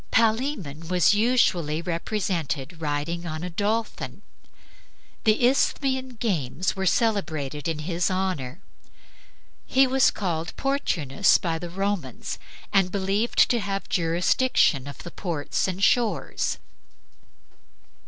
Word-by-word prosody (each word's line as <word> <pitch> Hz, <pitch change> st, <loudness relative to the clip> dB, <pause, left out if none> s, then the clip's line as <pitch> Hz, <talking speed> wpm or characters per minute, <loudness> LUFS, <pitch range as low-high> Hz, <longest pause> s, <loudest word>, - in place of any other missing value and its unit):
Palaemon 220 Hz, -, 0 dB
was 180 Hz, +1 st, +4 dB
usually 205 Hz, -9 st, +2 dB
represented 170 Hz, -4 st, -3 dB
riding 160 Hz, +3 st, -2 dB
on 155 Hz, +1 st, -4 dB
a 180 Hz, -, -4 dB
dolphin. 215 Hz, +5 st, -2 dB, 1.0 s
The 220 Hz, +2 st, +4 dB
Isthmian 260 Hz, 0 st, +1 dB
games 180 Hz, -, -1 dB
were 190 Hz, 0 st, -1 dB
celebrated 160 Hz, -, 0 dB
in 165 Hz, -2 st, -1 dB
his 170 Hz, +3 st, -1 dB
honor. 185 Hz, -6 st, -2 dB, 1.1 s
He 270 Hz, +1 st, +5 dB
was 265 Hz, 0 st, +4 dB
called 170 Hz, -4 st, -3 dB
Portunus 175 Hz, -, +2 dB
by 165 Hz, -2 st, -2 dB
the 175 Hz, +1 st, -6 dB
Romans, 190 Hz, -, -3 dB, 0.3 s
and 195 Hz, -2 st, +3 dB
believed 200 Hz, +4 st, +2 dB
to 240 Hz, -, +2 dB
have 195 Hz, -1 st, -3 dB
jurisdiction 170 Hz, -, +2 dB
of 140 Hz, -, -9 dB
the 175 Hz, -, -8 dB
ports 165 Hz, -4 st, -2 dB
and 190 Hz, +1 st, -3 dB
shores. 210 Hz, -, +1 dB
180 Hz, 110 wpm, -25 LUFS, 160-215 Hz, 1.1 s, He